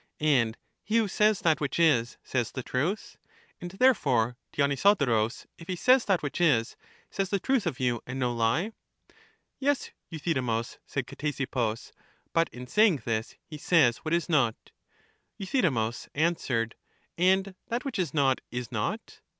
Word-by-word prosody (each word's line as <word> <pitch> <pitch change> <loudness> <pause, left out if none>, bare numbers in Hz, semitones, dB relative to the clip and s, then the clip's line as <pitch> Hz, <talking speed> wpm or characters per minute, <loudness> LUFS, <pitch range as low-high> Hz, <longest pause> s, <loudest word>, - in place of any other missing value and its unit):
And 125 -7 +2 0.3
he 220 +2 +1
who 225 -2 +3
says 210 +1 +2
that 160 -3 +2
which 145 +3 -2
is, 125 -9 +3
says 120 -4 -2
the 130 - -5
truth. 155 - -2 0.4
And 175 - -6
therefore 140 - +2 0.2
Dionysodorus, 140 - +2
if 165 - -11
he 185 - -2
says 255 +7 +4
that 190 -5 +1
which 145 +4 -3
is, 125 -9 +2 0.4
says 195 -1 -2
the 200 - 0
truth 255 -3 +1
of 145 -7 -3
you 120 -3 0
and 125 +1 -5
no 125 -2 0
lie. 120 - +1 0.9
Yes, 285 0 0 0.2
Euthydemus, 130 -9 -2
said - - -3
Ctesippus; 130 -6 -3 0.4
but 165 0 +2
in 125 +1 -9
saying 175 - +3
this, 115 0 -2
he 155 -3 -9
says 145 -8 +4
what 160 +1 -1
is 170 - -1
not. 135 -9 0 0.7
Euthydemus 150 - -1
answered: 140 -8 0 0.4
And 190 +2 +2
that 240 +3 -3
which 265 -7 -3
is 170 -7 0
not 135 -3 +2
is 125 -2 -5
not. - - -4
150 Hz, 150 wpm, -28 LUFS, 120-185 Hz, 0.9 s, says